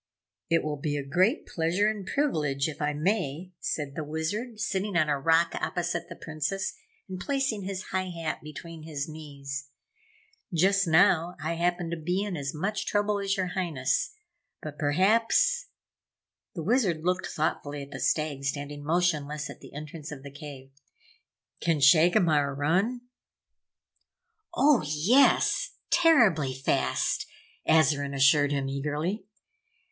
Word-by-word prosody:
"It 165 0 +3
will 150 -1 -2
be 145 +1 -2
a 140 - -4
great 185 - +2
pleasure 170 +5 +1
and 210 -3 -3
privilege, 150 - 0
if 155 -2 -7
I 150 0 +1
may," 160 +1 -1
said 145 -3 -3
the 155 - -4
Wizard, 205 +10 -3
sitting 200 -2 -1
on 155 -3 +2
a 145 -1 +1
rock 165 +3 +3
opposite 175 -1 -2
the - - -8
Princess 160 +5 -3 0.3
and 185 -1 -6
placing 270 -2 -1
his 190 -1 -4
high 185 0 -1
hat 165 -3 -4
between 160 +2 -9
his 150 -3 -4
knees. 140 -3 -7 0.8
"Just 190 +3 +3
now, 165 +1 +4
I 155 +3 -2
happen 175 0 -1
to 170 - -2
be 180 +5 -1
in 205 -3 -3
as 140 -3 -3
much 195 +6 -3
trouble 205 0 +1
as 195 0 -1
your 185 -2 -1
Highness. 170 - -1 0.4
But 150 -1 -8
perhaps 225 - +3 0.4
" - - -64
the 165 - -4
Wizard 190 -6 +1
looked 180 +2 0
thoughtfully 145 -2 -2
at 140 - -13
the 135 - -6
Stag 150 -3 0
standing 145 +1 -4
motionless 150 -3 0
at - - -12
the - - -13
entrance 155 +1 -8
of 135 -2 -8
the 140 - -9
cave 140 -3 -10 0.9
"can 165 -2 +1
Shagomar 155 -1 +4
run?" 185 - +1 1.5
"Oh, 295 -6 +4
yes! 225 - +3 0.2
Terribly 205 - +4
fast!" 135 - 0 0.4
Azarine 145 -3 +3
assured 145 +1 +4
him, 140 -1 -1
eagerly. 150 +9 -2
160 Hz, 140 wpm, -28 LUFS, 145-190 Hz, 1.5 s, now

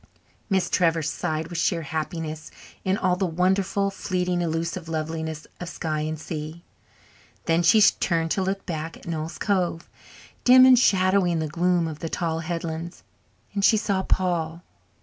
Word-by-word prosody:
Miss 190 -2 +2
Trevor 165 -2 +2
sighed 155 +1 -2
with 170 -2 -4
sheer 170 -1 +1
happiness 155 +1 -4 0.3
in 190 +1 +1
all 185 -4 +1
the 185 +1 0
wonderful, 190 +3 +1
fleeting, 180 -2 -1
elusive 165 +1 -3
loveliness 160 -1 -4
of 175 - -5
sky 155 -2 -3
and 155 0 -3
sea. 155 +1 -6 0.8
Then 165 +1 +2
she 195 +6 +5
turned 165 -5 +2
to 195 - +1
look 195 +1 -2
back 160 -2 -5
at - - -17
Noel's 160 0 -4
Cove, 180 -4 -1 0.6
dim 255 +1 +8
and 255 -2 +7
shadowy 185 -4 +3
in 170 - 0
the 160 -1 -1
gloom 175 +2 +1
of 155 -1 -6
the 165 - -4
tall 165 -1 -2
headlands, 165 0 -5 0.5
and 200 -1 -1
she 220 - +5
saw 200 -2 0
Paul. 175 -3 -1
170 Hz, 160 wpm, -25 LUFS, 160-185 Hz, 0.8 s, dim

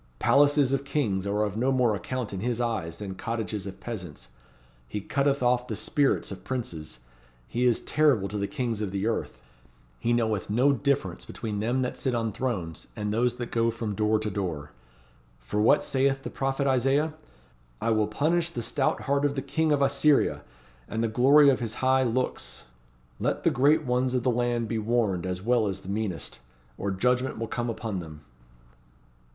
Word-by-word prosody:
Palaces 145 - +4
of 135 0 0
kings 110 -10 -1
are 105 +1 +1
of 105 -2 -2
no 125 +4 +1
more 125 -4 +3
account 125 +1 -4
in 95 - -3
His 120 +3 -1
eyes 110 -9 -2
than 100 -2 -5
cottages 110 -1 -4
of 95 - -8
peasants. 85 - -7 0.6
He 85 - -4
cutteth 140 +5 0
off 125 0 +2
the 110 - -3
spirits 140 +6 +1
of - - -8
Princes: 80 - -5 0.5
he 120 - 0
is 120 - +2
terrible 145 -10 +2
to 105 +2 -3
the 100 - -1
Kings 120 -6 -2
of 105 - -1
the 100 +1 -2
earth.' 115 - -2 0.6
He 120 - 0
knoweth 110 -4 0
no 125 +7 +4
difference 130 -10 -1
between 105 -3 -5
them 120 +5 0
that 125 - -3
sit 130 -3 -1
on 115 -1 0
thrones, 100 -9 -3
and 105 0 -2
those 120 +2 +1
that 120 -1 -6
go 115 0 +2
from 110 -2 -3
door 110 +1 +2
to 105 0 -3
door. 80 -7 -4 0.7
For 105 - -2
what 110 - +5
saith 135 0 +1
the - - -5
prophet 135 +1 -1
Isaiah? 135 +4 +2 0.7
'I 115 - 0
will 110 -1 +2
punish 165 +9 +1
the 120 -9 -5
stout 135 +3 0
heart 140 +1 0
of 145 -1 +1
the 135 - -1
King 160 +3 0
of 145 -1 +3
Assyria, 145 +1 +3 0.5
and 110 +1 -2
the - - +2
glory 140 +6 +6
of 130 - +2
his 115 -3 -3
high 130 0 +3
looks.' 125 0 -2 0.6
Let - - -1
the - - +4
Great 145 +5 +4
Ones 125 +1 0
of 125 - 0
the 125 - +3
land 120 -1 0
be 115 0 -1
warned 105 -5 0
as 90 0 -4
well 120 -1 +2
as 95 -1 -3
the 95 - -10
meanest, 100 - -3 0.4
or 100 - -3
judgment 125 +7 +1
will 115 - -2
come 120 +1 -2
upon 110 -4 -3
them." 80 -3 -9
120 Hz, 190 wpm, -27 LUFS, 105-130 Hz, 0.7 s, glory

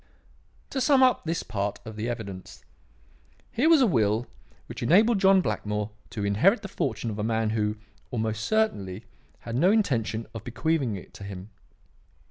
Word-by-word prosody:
"To 265 - -1
sum 265 0 +5
up 255 -7 +3
this 165 +1 -2
part 100 -1 -3
of 110 -1 -8
the 110 +3 -3
evidence. 100 -6 -7 0.9
Here 280 +8 +2
was 315 -5 +6
a - - +6
will 115 - +2 0.4
which - - -8
enabled 210 +5 +4
John 190 -1 +5
Blackmore 105 - -2 0.2
to 105 -2 -4
inherit 145 - +3
the - - -4
fortune 115 - -2
of 105 - -6
a - - -1
man 110 -1 0
who, 105 -1 -1 0.3
almost 110 -1 -2
certainly, 110 - -1 0.4
had 115 - -5
no 170 +9 +4
intention 115 - 0
of 115 -2 -7
bequeathing 135 -1 -1
it 95 - -10
to - - -10
him. 100 +1 -8
115 Hz, 165 wpm, -26 LUFS, -, 0.9 s, was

